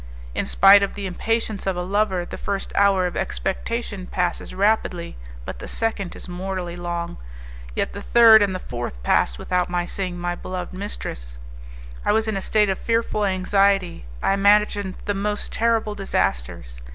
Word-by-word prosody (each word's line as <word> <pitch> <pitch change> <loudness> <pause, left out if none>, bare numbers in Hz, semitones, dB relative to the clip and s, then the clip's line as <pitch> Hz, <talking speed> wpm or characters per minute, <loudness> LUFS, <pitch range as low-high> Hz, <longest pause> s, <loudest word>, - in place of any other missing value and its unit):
In - - -2
spite 195 +1 +7
of 200 - -1
the 200 - -5
impatience 215 +2 -2
of 190 - +1
a 180 - -1
lover, 190 -1 0
the - - -7
first 200 -1 -3
hour 195 -2 +4
of 180 - -3
expectation 195 +1 -3
passes 180 -1 -2
rapidly, 190 -3 0 0.3
but - - -6
the - - -7
second 220 -5 -2
is - - -8
mortally 180 -1 -4
long. 175 - -4 0.6
Yet - - -1
the - - -6
third 225 -2 +7
and 195 -2 +1
the - - 0
fourth 120 - -6
passed 60 -1 +2
without 180 - -1
my 175 0 -1
seeing 180 -1 -3
my 175 0 -2
beloved 180 0 -6
mistress. 60 - -6 0.7
I - - +2
was 220 +1 +1
in 220 - -1
a 195 - -2
state 210 +1 +2
of 190 - -1
fearful 230 -2 0
anxiety; 195 - +1 0.2
I - - +3
imagined 200 -1 +3
the 205 - 0
most 205 +1 -2
terrible 225 -2 +1
disasters. - - -2
195 Hz, 170 wpm, -23 LUFS, 175-205 Hz, 0.7 s, spite